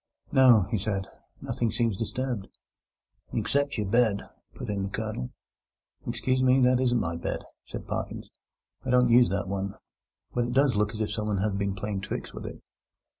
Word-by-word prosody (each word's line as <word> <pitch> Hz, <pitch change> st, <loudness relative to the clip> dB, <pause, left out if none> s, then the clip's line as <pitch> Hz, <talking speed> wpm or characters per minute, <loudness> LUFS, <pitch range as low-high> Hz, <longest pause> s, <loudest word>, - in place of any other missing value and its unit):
"No," 125 Hz, -6 st, +7 dB
he 110 Hz, -, +1 dB
said, 100 Hz, -1 st, -1 dB, 0.4 s
"nothing 120 Hz, -, -1 dB
seems 115 Hz, -2 st, +1 dB
disturbed." 115 Hz, 0 st, -3 dB, 0.9 s
"Except 140 Hz, -1 st, +1 dB
your 105 Hz, -, 0 dB
bed," 110 Hz, 0 st, +3 dB, 0.3 s
put -, -, -6 dB
in 100 Hz, -1 st, -1 dB
the 95 Hz, -, -2 dB
Colonel. 60 Hz, -9 st, -3 dB, 0.8 s
"Excuse 130 Hz, 0 st, 0 dB
me, 130 Hz, +1 st, +5 dB
that 125 Hz, 0 st, +5 dB
isn't 125 Hz, -2 st, +3 dB
my 85 Hz, -4 st, -1 dB
bed," 85 Hz, -, -3 dB, 0.2 s
said -, -, -7 dB
Parkins. -, -, -4 dB, 0.5 s
"I -, -, -5 dB
don't 125 Hz, -1 st, +5 dB
use 120 Hz, +1 st, +7 dB
that 100 Hz, 0 st, -1 dB
one. 100 Hz, 0 st, -2 dB, 0.6 s
But 120 Hz, -1 st, +1 dB
it 120 Hz, -, -3 dB
does 135 Hz, -2 st, +4 dB
look 105 Hz, +1 st, +1 dB
as 110 Hz, -, -3 dB
if 105 Hz, -1 st, -1 dB
someone 105 Hz, -1 st, -1 dB
had 100 Hz, 0 st, 0 dB
been 100 Hz, -1 st, 0 dB
playing 100 Hz, 0 st, -3 dB
tricks -, -, -5 dB
with -, -, -6 dB
it." -, -, -9 dB
110 Hz, 175 wpm, -28 LUFS, 100-125 Hz, 0.9 s, No